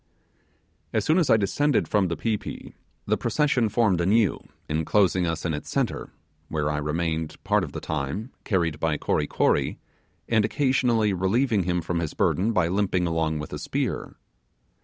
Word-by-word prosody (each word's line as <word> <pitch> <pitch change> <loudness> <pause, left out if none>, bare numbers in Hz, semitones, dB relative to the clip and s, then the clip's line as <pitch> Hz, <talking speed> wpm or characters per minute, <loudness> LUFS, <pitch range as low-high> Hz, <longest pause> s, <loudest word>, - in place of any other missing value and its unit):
As 110 -2 +1
soon 160 +4 +4
as 165 - +1
I 110 - +6
descended 140 +8 +1
from 100 -3 +2
the 85 - -3
pi 115 -2 0
pi, - - -8 0.3
the - - +1
procession 135 -7 +1
formed 105 -5 +2
anew, 105 +4 +3 0.3
enclosing 90 +3 +2
us 80 0 -3
in 80 - 0
its 75 - -5
centre; - - -1 0.4
where 75 -1 -1
I 75 - -1
remained 80 +1 -2
part - - +2
of - - -5
the - - -4
time, 80 - -3
carried 85 -7 0
by 80 -2 0
Kory 75 0 0
Kory, - - +1 0.5
and 110 -2 +3
occasionally 120 -4 +2
relieving 100 +2 +1
him 90 -1 0
from 85 +1 -2
his 80 -3 -3
burden 100 +6 +1
by 95 -6 +2
limping 95 -1 +1
along 80 -2 0
with 75 - -5
spear. - - -3
95 Hz, 165 wpm, -25 LUFS, 80-110 Hz, 0.5 s, I